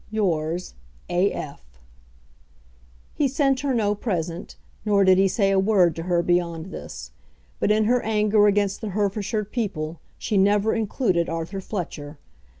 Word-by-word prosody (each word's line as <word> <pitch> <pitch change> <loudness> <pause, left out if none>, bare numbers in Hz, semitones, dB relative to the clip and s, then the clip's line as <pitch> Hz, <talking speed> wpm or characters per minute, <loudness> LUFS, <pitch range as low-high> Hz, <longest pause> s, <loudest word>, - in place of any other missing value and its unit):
Yours, 175 -5 -1 0.4
A. 180 +3 +2
F. 140 - -6 1.5
He 290 - +1
sent 270 0 +1
her 280 0 -1
no 215 -4 +1
present, 180 -4 -4 0.3
nor 205 -2 +3
did 190 -1 +5
he 195 - +5
say 195 0 +1
a 195 - +3
word 190 -5 +3
to 165 - -5
her 175 -1 +2
beyond 175 0 -1
this; - - -8 0.5
but - - +1
in 215 +1 +3
her 245 +3 +2
anger 210 -1 +3
against 200 -1 +1
the 215 - -3
Herefordshire 210 +1 -1
people 175 -8 -4 0.2
she 210 - -1
never 205 +2 +3
included 210 -5 0
Arthur 165 +4 -4
Fletcher. 155 -7 -6
200 Hz, 150 wpm, -24 LUFS, 175-215 Hz, 1.5 s, did